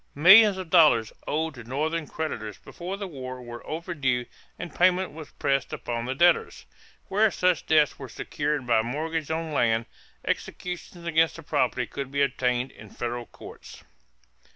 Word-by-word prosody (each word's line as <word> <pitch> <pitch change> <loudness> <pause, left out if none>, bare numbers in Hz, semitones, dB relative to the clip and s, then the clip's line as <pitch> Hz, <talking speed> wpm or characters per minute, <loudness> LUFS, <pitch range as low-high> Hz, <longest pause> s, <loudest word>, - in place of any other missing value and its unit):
Millions 195 +6 +8
of 185 -3 -7
dollars 150 - +5
owed 160 +1 -1
to 120 -3 -10
Northern 155 +6 -2
creditors 110 -10 -4
before 180 +3 -7
the 200 - -5
war 130 -5 -7
were 120 -1 -9
overdue 145 -7 -1 0.3
and 165 - -7
payment 185 +1 +3
was 155 -1 -10
pressed 135 0 0
upon 120 -1 -4
the 130 +2 -3
debtors. 175 - +2 0.4
Where 210 +3 +3
such 180 -3 +1
debts 150 -2 +3
were 135 -2 -8
secured 145 +2 -3
by 115 -2 +3
mortgages 155 +6 -3
on 160 -1 -2
land, 115 -3 +2 0.4
executions 180 -1 -4
against 165 -1 +2
the 165 - -10
property 125 -3 0
could 135 +4 -6
be 140 0 +2
obtained 125 -2 0
in 110 - -14
federal 120 +1 -4
courts. - - -12
150 Hz, 155 wpm, -26 LUFS, 125-170 Hz, 0.4 s, Millions